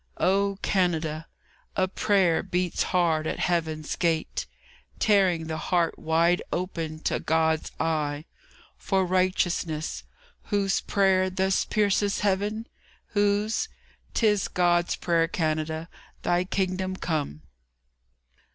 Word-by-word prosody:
O 200 +1 +2
Canada! 165 -4 0 0.5
A 185 -1 +2
prayer 190 -3 +2
beats 180 -1 -1
hard 165 -4 +2
at - - -2
Heaven's 160 -3 -1
gate, 165 -2 -1 0.5
Tearing 190 -6 +3
the 160 0 -3
heart 170 0 0
wide 165 +2 +2
open 165 -3 -3
to - - 0
God's 160 0 +1
eye, 155 -2 -1 0.5
For 190 -1 +1
righteousness. 175 -3 0 0.4
Whose 200 -2 +1
prayer 190 -2 +2
thus 190 +1 +1
pierces 205 -1 +1
Heaven? 205 +3 0 0.4
Whose? 205 - +1 0.5
'Tis 210 -4 +2
God's 175 -1 +2
prayer, 165 -1 +1
Canada, 160 -1 -2 0.4
Thy 175 +1 +1
Kingdom 185 0 -1
come! 145 - -3
180 Hz, 105 wpm, -26 LUFS, 160-195 Hz, 0.5 s, Tearing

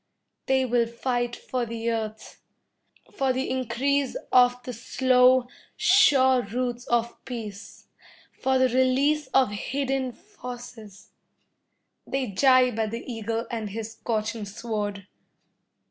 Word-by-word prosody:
They 265 -1 +2
will 240 -1 +2
fight 240 0 -2
for 255 -1 -3
the 230 0 -3
earth, 220 -1 -5 0.7
for 270 -1 +1
the 260 +1 -2
increase 260 +2 0
of 245 -1 +6
the 250 - -6
slow, 250 +1 +3 0.3
sure 260 -3 +5
roots 245 +3 -4
of 235 0 -1
peace, 220 -5 -8 0.5
for 265 0 0
the 260 0 +3
release 260 +4 +2
of 260 -4 +3
hidden 265 +4 -2
forces. 240 -4 -11 1.0
They 265 -5 -2
jibe 255 +1 +4
at 220 -1 0
the 230 +2 -6
eagle 230 -1 -3
and 225 -3 -3
his 220 +2 -5
scorching 220 -1 -3
sword. 205 -2 -4
245 Hz, 115 wpm, -26 LUFS, 225-260 Hz, 1.0 s, of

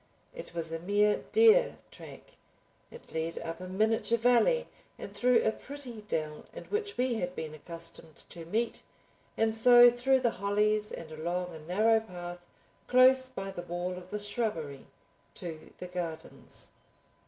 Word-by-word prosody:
It - - -9
was 165 -1 -3
a 165 - -3
mere 205 +4 +1
deer 455 +3 +5
track. - - -12 0.6
It 475 - -14
led 160 +1 -3
up 165 0 -5
a 185 - -6
miniature 220 +4 +1
valley 245 - +3 0.3
and - - -9
through 245 -1 +3
a - - +2
pretty 255 -3 -8
dell 155 -4 -3
in - - -7
which 415 0 -3
we 250 -2 +1
had 180 0 -3
been 155 -1 -5
accustomed 165 0 -9
to 170 - -8
meet, 225 +7 -2 0.6
and 225 0 +2
so 240 +2 +8
through 260 +2 +2
the 240 -2 +2
hollies 210 +1 +1
and 160 -1 -8
along 175 +3 -3
a 160 - -9
narrow 215 +8 +2
path 175 -4 -8 0.5
close 260 +1 +5
by 195 -6 -6
the 180 - -6
wall 175 +1 -4
of 180 0 -11
the 210 - -3
shrubbery 205 - -3 0.5
to 165 -3 -8
the - - -7
gardens. 170 -3 -7
205 Hz, 155 wpm, -30 LUFS, 170-245 Hz, 0.6 s, so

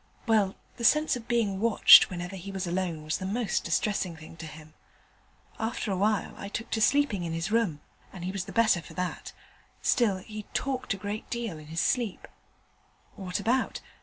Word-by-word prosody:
Well, 215 -4 +2 0.2
the 235 - -6
sense 300 +4 +4
of 235 -2 -8
being 215 -5 +1
watched 230 +1 +8
whenever 180 +1 -5
he 190 +1 -7
was 190 -1 -3
alone 175 -3 -2
was 155 0 -2
the 185 - -5
most 215 0 -1
distressing 180 +1 0
thing 160 0 -12
to 160 - -7
him. 155 0 -12 0.9
After 220 -1 -2
a - - 0
time 210 +2 0
I 200 - -6
took 230 +3 -5
to 220 - 0
sleeping 250 -6 +3
in 165 -1 -3
his 165 +4 -2
room, 210 -10 +1 0.3
and 180 -2 -7
he 185 - -2
was 190 -2 -4
the - - -8
better 220 -6 +3
for - - -13
that: 180 -1 -4 0.5
still, 215 -6 +3
he 210 +2 -9
talked 255 -5 -1
a - - -9
great 205 +2 -5
deal 230 -9 -4
in 150 - -13
his 165 +1 -2
sleep. 235 -3 -1 0.9
What 185 -1 -3
about? 240 +6 0
200 Hz, 195 wpm, -28 LUFS, 175-230 Hz, 0.9 s, watched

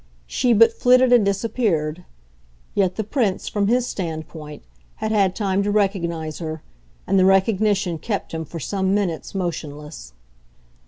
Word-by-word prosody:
She 245 - 0
but 230 +1 +6
flitted 250 +1 +4
and 240 -3 +6
disappeared; 195 -6 -1 0.7
yet 185 -2 +1
the 220 - -2
Prince, 215 -3 -1
from 205 -2 0
his 245 +2 +2
standpoint, 160 -6 -6 0.3
had 220 - -3
had 195 -3 +2
time 195 -2 0
to 200 - -1
recognise 170 -6 -1
her, 160 -2 -5 0.4
and 195 0 +2
the 185 - +5
recognition 195 -2 +2
kept 200 +5 -3
him 160 0 -4
for 165 +2 -8
some 190 +6 0
minutes 190 -3 -2
motionless. 150 - -5
195 Hz, 145 wpm, -22 LUFS, 165-210 Hz, 0.7 s, but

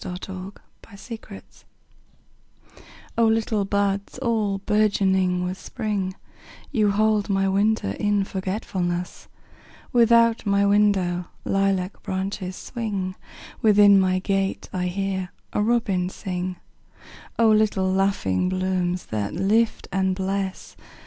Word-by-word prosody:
A 180 - -5
Song 190 0 -7 0.4
in 200 - -12
Spring 220 -1 -9 1.8
O 230 - +5
LITTLE 220 -2 +1
buds 200 +1 -1
all 225 -6 0
bourgeoning 190 -3 +2
with 185 +1 -4
Spring, 200 -4 -3 0.6
You 215 -7 +2
hold 210 0 +2
my 195 0 +2
winter 200 - +1
in 205 - +1
forgetfulness; 185 -2 -3 0.7
Without 230 -1 +4
my 200 -1 +2
window 200 -4 +2 0.2
lilac 195 -1 0
branches 190 -1 -4
swing, 200 -6 -4 0.5
Within 205 -2 +6
my 185 -1 +2
gate 195 0 -1
I 180 -1 -1
hear 190 0 -2 0.2
a - - +1
robin 210 -5 +1
sing—O 185 +4 -5
little 215 -3 +2
laughing 185 - +1
blooms 185 -1 -1
that 105 +1 -3
lift 215 +5 +1
and 190 -1 +1
bless! 190 0 -3
195 Hz, 110 wpm, -24 LUFS, 185-210 Hz, 1.8 s, Within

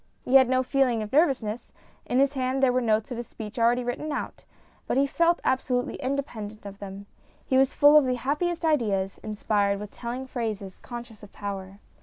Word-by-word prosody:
He 250 - -2
had 260 -2 +7
no 255 0 +2
feeling 255 -4 +1
of 210 - -9
nervousness; 260 -8 +1 0.4
in 250 - 0
his 275 +1 +3
hand 260 0 -1
were 255 -1 +3
the 235 - -3
notes 215 +3 +1
of 245 - -3
his 240 -1 -5
speech 220 +2 -8
already 240 +2 +3
written 245 +6 -3
out, 285 - -5 0.4
but - - 0
he 275 - +4
felt 335 +4 +2
absolutely 255 0 0
independent 240 -7 -4
of 200 0 -9
them. 200 0 -8 0.4
He 260 - 0
was 270 0 +4
full 290 0 +6
of 290 - 0
the 255 -1 +1
happiest 315 +7 -1
ideas, 205 -11 +1
inspired 205 -1 0
with 210 0 -7
telling 245 +2 -5
phrases, 220 -7 -4
conscious 240 -3 -9
of 205 - -13
power. 195 -1 -6
245 Hz, 195 wpm, -26 LUFS, 210-270 Hz, 0.4 s, had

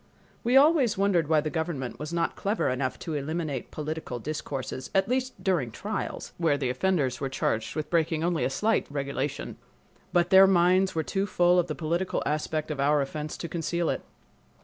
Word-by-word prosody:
We 245 +3 +4
always 280 - +5
wondered 190 -5 +2
why 155 -1 +3
the 155 0 -3
government 160 -6 -3
was 150 +1 -5
not 170 -1 0
clever 205 +2 0
enough 130 0 -1
to 160 - -5
eliminate 150 -2 -3
political 155 -4 -4
discourses, 135 -1 -5
at 195 0 +3
least 255 +1 -2
during 170 -11 +1
trials, 205 - -5
where 160 -4 +2
the 130 -3 -1
offenders 135 -3 0
were 135 - -1
charged 110 -4 -1
with 155 -1 -4
breaking 160 -1 +1
a 170 -5 +1
slight 215 +12 +1
regulation. 140 0 -3 0.5
But 175 0 +2
their 190 0 +9
minds 185 0 +3
were 160 - +1
too 195 +3 -1
full 180 -1 +4
of 175 - +1
the 155 - -3
political 170 +5 -1
aspect 155 +1 -1
of 145 - -4
our 145 +2 +3
offense 150 +2 -5
to 170 - -5
conceal 170 +1 -1
it. - - -3
160 Hz, 180 wpm, -27 LUFS, 145-185 Hz, 0.5 s, their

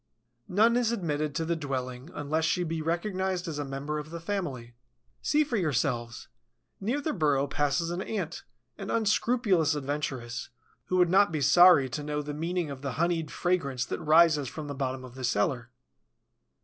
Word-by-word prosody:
None 225 +6 +4
is 240 -2 +2
admitted 155 -8 -2
to 165 - -1
the 170 +1 0
dwelling 130 -2 -4
unless 150 +2 -1
she 180 +3 +1
be 165 -1 -3
recognized 185 +2 -1
as 155 -3 -4
a - - -1
member 140 +2 -4
of 150 +1 -8
the 170 +1 -6
family. 165 -11 -4 0.5
See 300 +1 +3
for 260 -6 -2
yourselves. 125 - -1 0.5
Near 240 +9 -1
the 310 +2 -2
burrow 145 -6 +2
passes 145 +4 0
an 175 +2 -3
Ant, 185 -5 -4 0.4
an 195 - -6
unscrupulous 215 - +2
adventuress, 135 -4 -4 0.4
who 185 - 0
would 175 -1 +4
not 200 0 +5
be 155 - -1
sorry 175 -2 +7
to 125 +5 -4
know 150 0 -2
the 145 0 -5
meaning 165 +1 -2
of 135 -1 -8
the 140 -2 -3
honeyed 165 0 0
fragrance 140 -10 -1
that - - -4
rises 155 -2 +5
from 155 +5 -6
the 145 - -5
bottom 130 -1 -3
of 125 - -12
the 130 0 -8
cellar. 120 +2 0
155 Hz, 175 wpm, -28 LUFS, 140-180 Hz, 0.5 s, sorry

